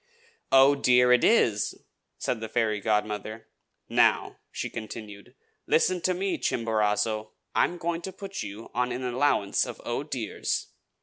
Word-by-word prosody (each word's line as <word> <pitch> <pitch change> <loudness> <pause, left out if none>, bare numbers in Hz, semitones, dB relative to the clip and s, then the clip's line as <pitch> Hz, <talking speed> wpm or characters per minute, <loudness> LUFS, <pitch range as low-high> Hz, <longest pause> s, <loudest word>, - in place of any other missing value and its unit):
"'Oh, 135 +1 +7
dear!' 125 -3 +4
it 125 - +3
is!" 115 - +3 0.4
said 115 - -2
the 110 - -5
fairy 110 -3 0
godmother. 105 +1 -2 0.4
"Now," - - +2
she - - -4
continued, 110 +1 -9 0.3
"listen 180 +2 +2
to 185 +1 +1
me, 190 +1 -1
Chimborazo! 110 -1 0 0.2
I - - +4
am 175 - -5
going 170 0 -2
to 190 - -6
put 195 0 -7
you 105 +3 -8
on 125 +1 0
an 125 +1 -4
allowance 125 -5 +1
of - - -7
'Oh, - - -2
dears.' - - -3
120 Hz, 145 wpm, -27 LUFS, 110-145 Hz, 0.4 s, Oh